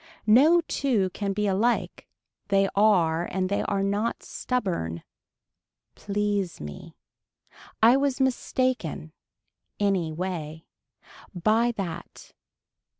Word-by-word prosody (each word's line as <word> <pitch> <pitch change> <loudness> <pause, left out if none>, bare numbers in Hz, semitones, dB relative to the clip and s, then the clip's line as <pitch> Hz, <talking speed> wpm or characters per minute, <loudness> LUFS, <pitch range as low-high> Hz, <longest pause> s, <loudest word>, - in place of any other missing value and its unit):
No 290 +11 +6
two 240 - 0
can 200 +1 -3
be 210 +2 -1
alike. 205 +5 0 0.4
They 195 0 +3
are 175 -5 +3
and 185 0 -2
they 200 - 0
are 195 -1 -1
not 205 +4 -1
stubborn. 170 - -3 0.9
Please 205 -2 -2
me. 75 -1 -9 0.9
I 240 +4 +7
was 275 -1 0
mistaken. 255 - -1 0.7
Any 195 -6 +1
way. 160 -2 -5 0.7
By 220 +6 +2
that. 170 -5 -7
200 Hz, 95 wpm, -26 LUFS, 175-235 Hz, 0.9 s, I